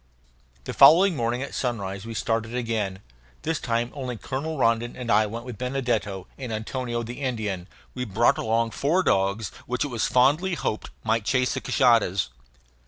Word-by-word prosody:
The - - -5
following 180 +2 +7
morning 120 0 -1
at 140 - -7
sunrise 100 -5 -3
we 115 - -6
started 115 +1 -1
again. 110 -6 -2 0.4
This 160 -1 -1
time 120 -1 -1
only 130 -4 -5
Colonel 145 +7 -4
Rondon 115 -1 +1
and 125 -2 -3
I 110 0 +4
went 115 +3 -6
with 125 -4 -8
Benedetto 120 -7 -1
and 125 -4 -5
Antonio 120 +2 -3
the 120 +4 -7
Indian. 105 -8 -2 0.3
We 125 -1 -3
brought 115 +2 +2
along 115 +1 +1
four 165 - +1
dogs 100 - +1 0.2
which 125 +4 -1
it - - -4
was 120 -3 0
fondly 150 +9 +3
hoped 110 - -3
might 110 0 +1
chase 125 +1 +2
the - - -3
cashadas. 115 - +3
120 Hz, 170 wpm, -25 LUFS, 110-130 Hz, 0.4 s, following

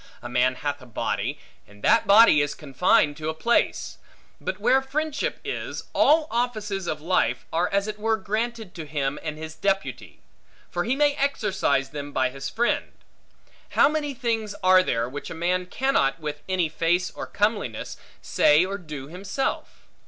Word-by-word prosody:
A - - -5
man 125 +1 +2
hath 145 +1 -3
a 125 - -13
body, 115 - -2 0.3
and 105 +1 -18
that 230 - +4
body 200 -7 +7
is 145 0 -2
confined 145 0 +2
to 155 -1 -3
a 160 - -3
place; 235 +8 0 0.4
but - - -4
where 265 - +4
friendship 300 +3 -2
is, - - -4
all 310 +1 +4
offices 215 -6 -2
of 155 -1 -3
life 140 -8 +1
are 170 +2 +1
as 200 +1 +1
it 210 0 -5
were 220 +1 +1
granted 220 -1 -3
to 160 -3 -7
him, 145 -1 -2
and 155 -1 -5
his 160 0 -7
deputy. 195 +4 -2 0.5
For 175 0 -1
he 245 +4 +1
may 290 0 +3
exercise 195 - 0
them 145 -1 -6
by 130 -1 +1
his 135 +1 -5
friend. 240 +1 0 0.8
How - - +7
many 295 -2 -2
things 225 -4 -2
are 185 0 +7
there 115 -9 -1
which 145 +3 -7
a - - -6
man 180 +2 0
cannot, 180 - +1
with 150 -1 -5
any 185 -3 +1
face 170 +3 0
or - - -7
comeliness, 205 - -1 0.3
say 150 +4 +4
or 195 +1 -4
do 150 -6 -8
himself? 195 - -4
180 Hz, 170 wpm, -25 LUFS, 145-220 Hz, 0.8 s, body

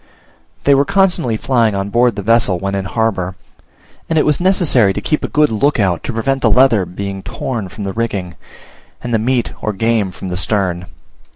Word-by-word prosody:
They 140 - +4
were 140 0 +4
constantly 175 - +1
flying 115 -4 +1
on 100 +1 -2
board 120 -1 +2
the 100 - -5
vessel 115 -3 +2
when 100 +2 -3
in 100 -1 -2
the - - -6
harbour; 95 -5 -1 0.7
and 165 - 0
it 155 - +3
was 150 -1 +2
necessary 175 - +3
to - - -3
keep 155 - -1
a - - -1
good 150 -2 +2
look 130 +5 +1
out 95 -5 +1
to - - -3
prevent 135 +4 -1
the - - +3
leather 120 -8 +4
being 100 +1 -6
torn 110 -1 -5
from 105 - -8
the 95 -1 -4
rigging, 100 -6 -3 0.7
and 120 - -4
the 110 - +2
meat 120 +1 0
or 110 - -2
game 110 0 0
from 95 - -8
the 90 - -3
stern. 90 -2 -1
110 Hz, 205 wpm, -16 LUFS, 95-130 Hz, 0.7 s, They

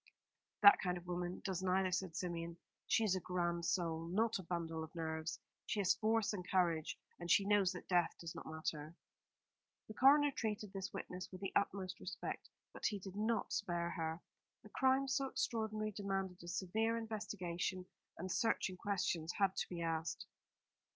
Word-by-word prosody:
"That 200 - +11
kind 180 -1 0
of 175 - -9
woman 175 0 -3
does 190 -3 -1
neither," 185 0 +2
said 180 -2 -1
Symeon. 170 -1 -3 0.3
"She 225 - +3
is 200 -4 +3
a - - 0
grand 175 -1 -1
soul, 165 -2 0
not 220 +5 +1
a - - -6
bundle 165 -2 -2
of 160 +2 -10
nerves. 160 -1 -3 0.3
She 215 - 0
has 190 -2 +4
force 220 -1 +2
and 185 -3 -3
courage; 170 -4 +2 0.2
and 175 0 -6
she 195 - +6
knows 200 -2 +4
that 180 - -8
death 175 -3 +4
does 170 -1 -6
not - - -8
matter." 160 0 -4 0.9
The 215 - -7
coroner 285 +5 +6
treated 210 -5 -3
this 195 0 -4
witness 180 0 -6
with 185 - -8
the 195 - -4
utmost 190 -2 0
respect, - - -5 0.2
but - - 0
he 210 - -1
did 190 0 -8
not 220 +1 0
spare 175 -4 -1
her. 165 -1 -3 0.4
A - - -11
crime 265 +1 +3
so 270 +1 +1
extraordinary 215 -4 -1
demanded 195 -2 -2
a 170 - -10
severe 220 +6 0
investigation, 195 -5 -3 0.3
and 185 +2 -4
searching 195 -5 +1
questions 180 -5 -1
had 195 -2 +2
to - - -2
be 170 -2 -3
asked. 165 0 -2
185 Hz, 175 wpm, -38 LUFS, 170-210 Hz, 0.9 s, That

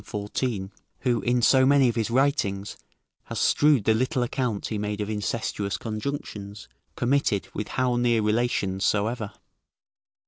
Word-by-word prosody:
14.] 105 -1 -3 0.3
who, 120 -2 +1
in 120 0 +1
so 130 +4 +5
many 135 0 +5
of 120 - +1
his 115 -2 0
writings, 120 -7 0 0.5
has - - -5
strewed 145 -6 +4
the 110 - +3
little 130 +3 0
account 120 -4 -2
he 110 - -2
made 105 0 -3
of 105 +1 -2
incestuous 105 -1 -2
conjunctions, 110 -3 -5 0.3
committed 120 -6 +1
with 105 - -4
how 125 -2 0
near 120 -2 +2
relations 105 -4 0
soever. 105 +1 0
115 Hz, 140 wpm, -25 LUFS, 105-125 Hz, 0.5 s, so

